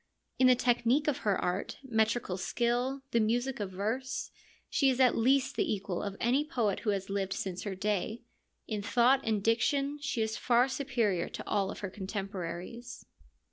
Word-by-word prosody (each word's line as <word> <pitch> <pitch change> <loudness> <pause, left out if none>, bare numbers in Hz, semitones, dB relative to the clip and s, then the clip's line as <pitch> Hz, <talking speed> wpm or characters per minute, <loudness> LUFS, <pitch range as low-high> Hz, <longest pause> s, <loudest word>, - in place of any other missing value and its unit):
In 260 - +6
the 255 - +7
technique 245 +4 +2
of 295 - +1
her 205 -3 +1
art, 180 +2 -2
metrical 220 -5 0
skill, 245 +7 -1
the 235 - +3
music 240 +4 0
of 205 -2 -2
verse, 225 +8 -3 0.4
she 275 -3 +3
is 260 -1 0
at 255 -2 +5
least 265 +3 +2
the - - 0
equal 195 -3 -4
of 200 -1 -4
any 255 +5 +2
poet 235 - 0
who 220 - -2
has 195 -1 -1
lived 195 -1 -1
since 185 -2 -4
her 200 -2 -3
day; 210 +3 -2 0.4
in 215 -2 -2
thought 240 +6 +4
and 215 -3 0
diction 275 +6 +1
she 275 -6 -1
is 220 0 -2
far 245 +1 +3
superior 245 -9 0
to - - -8
all 200 -2 0
her 200 - -5
contemporaries. 195 +3 -6
230 Hz, 175 wpm, -31 LUFS, 200-255 Hz, 0.4 s, the